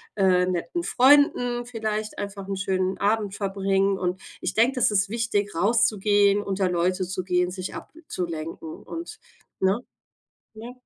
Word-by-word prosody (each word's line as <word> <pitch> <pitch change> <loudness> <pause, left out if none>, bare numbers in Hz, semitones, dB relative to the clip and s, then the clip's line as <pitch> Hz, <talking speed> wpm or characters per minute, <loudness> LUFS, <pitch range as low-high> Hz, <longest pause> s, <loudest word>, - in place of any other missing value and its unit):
äh, 185 -2 +3
netten 185 - -2
Freunden 245 -3 +4
vielleicht 215 -2 -4
einfach 200 -1 -6
'n 195 - -2
schönen 190 -1 -1
Abend 205 -1 0
verbringen. 195 0 0
Und 180 0 -2 0.2
ich - - -2
denke, 235 +4 +4
das 245 -3 +2
ist 195 -1 +2
wichtig 210 -4 -1
rauszugehen, 205 0 +3
unter 195 -2 -1
Leute 180 +1 0
zu 185 0 -4
gehen, 180 -1 +1
sich 185 0 -6
abzulenken 165 - -6
und, 340 +6 -8 0.4
ne? 190 +4 +2 0.8
Ja. 230 +3 -8
200 Hz, 140 wpm, -25 LUFS, 185-225 Hz, 0.8 s, Freunden